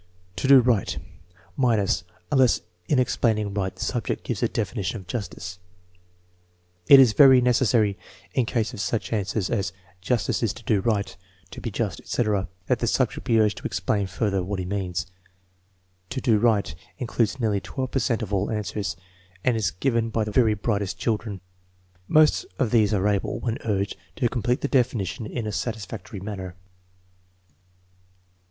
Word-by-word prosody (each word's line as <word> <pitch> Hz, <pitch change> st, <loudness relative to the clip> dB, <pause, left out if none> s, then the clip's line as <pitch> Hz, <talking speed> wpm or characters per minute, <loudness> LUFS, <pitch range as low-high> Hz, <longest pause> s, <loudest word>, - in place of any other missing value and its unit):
"To 115 Hz, -, -1 dB
do 135 Hz, -1 st, +8 dB
right" 120 Hz, -5 st, +1 dB, 0.6 s
(minuSy 110 Hz, -6 st, +2 dB, 0.3 s
unless 130 Hz, -4 st, +4 dB, 0.3 s
in 145 Hz, -, +2 dB
explaining 110 Hz, -5 st, +1 dB
right 95 Hz, -2 st, -2 dB
the -, -, -5 dB
subject -, -, -2 dB
gives -, -, -3 dB
a -, -, +3 dB
definition 105 Hz, 0 st, -2 dB
of 95 Hz, -, -12 dB
justice). 95 Hz, -3 st, -6 dB, 1.3 s
It 140 Hz, -, +10 dB
is 125 Hz, -5 st, +6 dB
very 135 Hz, +1 st, +8 dB
necessary, 115 Hz, -4 st, +2 dB, 0.3 s
in 125 Hz, -4 st, +1 dB
case 115 Hz, +1 st, -1 dB
of 115 Hz, -, -7 dB
such 115 Hz, +2 st, -2 dB
answers 100 Hz, -1 st, -1 dB
as 95 Hz, -2 st, 0 dB, 0.3 s
"Justice 115 Hz, +3 st, 0 dB
is 115 Hz, -5 st, +1 dB
to 115 Hz, -, -13 dB
do 110 Hz, -3 st, +2 dB
right," 105 Hz, -2 st, -1 dB, 0.4 s
"To -, -, -8 dB
be -, -, -3 dB
just," 105 Hz, -3 st, -2 dB
etc., 105 Hz, -5 st, -1 dB, 0.2 s
that -, -, +1 dB
the -, -, 0 dB
subject -, -, 0 dB
be 115 Hz, -1 st, +4 dB
urged 105 Hz, -2 st, +2 dB
to -, -, -18 dB
explain 95 Hz, +1 st, 0 dB
further 95 Hz, 0 st, -1 dB
what 100 Hz, +2 st, -3 dB
he 95 Hz, -, -3 dB
means. 95 Hz, -2 st, -2 dB, 1.0 s
"To 135 Hz, -, -3 dB
do 115 Hz, -5 st, +3 dB
right" 105 Hz, -8 st, +2 dB, 0.2 s
includes 120 Hz, 0 st, -1 dB
nearly 105 Hz, -4 st, +1 dB
12 130 Hz, -2 st, -4 dB
per 135 Hz, -, +1 dB
cent 115 Hz, -2 st, 0 dB
of 105 Hz, -1 st, -5 dB
all 100 Hz, 0 st, +1 dB
answers, 105 Hz, -1 st, -3 dB, 0.5 s
and 125 Hz, -, +2 dB
is 110 Hz, -6 st, +1 dB
given 115 Hz, +3 st, 0 dB
by 110 Hz, 0 st, 0 dB
the 105 Hz, -, -4 dB
very 110 Hz, -1 st, +3 dB
brightest 100 Hz, -2 st, -2 dB
children. 105 Hz, -3 st, -2 dB, 0.7 s
Most 155 Hz, 0 st, +4 dB
of 120 Hz, -5 st, 0 dB
these 110 Hz, -3 st, +4 dB
are 100 Hz, -1 st, +2 dB
able, 100 Hz, -2 st, 0 dB
when 115 Hz, -2 st, -2 dB
urged, 100 Hz, -2 st, -1 dB, 0.2 s
to 140 Hz, -7 st, +1 dB
complete 125 Hz, +1 st, -1 dB
the -, -, 0 dB
definition 120 Hz, -, 0 dB
in 120 Hz, -1 st, -4 dB
a 105 Hz, -, -2 dB
satisfactory 105 Hz, -2 st, -5 dB
manner. 95 Hz, -2 st, -6 dB
110 Hz, 165 wpm, -25 LUFS, 100-120 Hz, 1.3 s, It